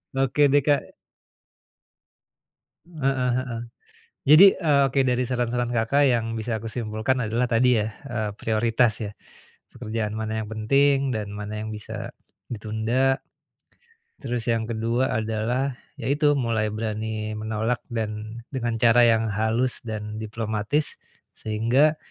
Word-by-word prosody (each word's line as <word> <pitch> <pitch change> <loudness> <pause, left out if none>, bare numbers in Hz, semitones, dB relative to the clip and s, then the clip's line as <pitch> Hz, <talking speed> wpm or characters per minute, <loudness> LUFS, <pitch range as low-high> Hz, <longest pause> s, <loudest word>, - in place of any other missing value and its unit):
Oke 135 +2 +3
deh, 145 0 +5
Kak. 145 -1 +1 1.9
Heeh 135 -6 -1
heeh. 120 -3 -3 0.7
Jadi, 170 +6 +10
eee, 150 -6 +2
oke, 135 +1 +1
dari 125 0 +1
saran-saran 120 -1 -1
Kakak 120 +5 +2
yang 115 -2 +1
bisa 110 -1 -2
aku 115 - -6
simpulkan 110 +2 -1
adalah 120 +3 0
tadi 120 -1 +3
ya, 105 - -1 0.2
eee, 110 -4 -2
prioritas 115 +1 +2
ya, 100 - -5 0.6
pekerjaan 110 -3 -3
mana 110 0 -2
yang - - -10
penting 135 +5 +2
dan 105 -2 -3
mana 105 +1 -5
yang 110 - -5
bisa 105 -1 -7 0.4
ditunda, 115 +5 0 1.0
terus 120 -3 -3
yang 115 -1 +1
ke-2 115 +3 0
adalah 115 +4 -1 0.2
yaitu 145 +4 +2
mulai 115 -4 0
berani 110 0 -3
menolak 110 +2 -2
dan 110 +1 -4
dengan 120 -3 -1
cara 120 +1 +6
yang 115 -1 +2
halus 110 +4 0
dan 105 -1 -5
diplomatis, 110 +5 -2 0.4
sehingga 120 +8 +2
115 Hz, 125 wpm, -24 LUFS, 110-130 Hz, 1.9 s, Jadi